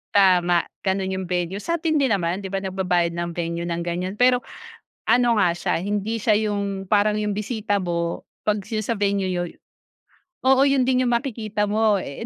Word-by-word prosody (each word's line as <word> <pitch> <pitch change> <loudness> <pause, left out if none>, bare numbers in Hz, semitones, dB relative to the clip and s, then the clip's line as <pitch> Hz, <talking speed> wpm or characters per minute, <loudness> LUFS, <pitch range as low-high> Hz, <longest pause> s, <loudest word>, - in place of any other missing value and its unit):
Tama 180 -3 +4 0.2
ganun 190 0 0
yung 190 0 -3
venue. 180 +2 -2
Sa'tin 325 +1 0
din 270 -4 +2
naman 180 -1 0
di 195 - -6
ba 195 - -2
nagbabayad 180 -3 0
ng 170 0 -3
venue 170 0 -3
ng 170 0 -2
ganyan 180 +3 -3
pero 250 +1 +4 0.7
ano 240 -1 +4
nga 180 -4 +4
siya 175 - -2
hindi 210 +3 -1
siya 220 0 +2 0.2
yung 200 -2 -3
parang 210 0 +3
yung 210 -1 -1
bisita 210 -1 -1
mo 170 -2 -2 0.2
pag 210 0 +3
sila 215 -2 -2
sa 230 +2 -1
venue 200 -1 +1
niyo 175 -1 -1
y - - -12 0.9
oo 265 +1 +5
yun 275 -2 +3
din 255 0 +2
yung 240 - +1
makikita 215 -5 -2
mo 215 -2 +3
eh 140 - -7
200 Hz, 185 wpm, -23 LUFS, 180-225 Hz, 0.9 s, oo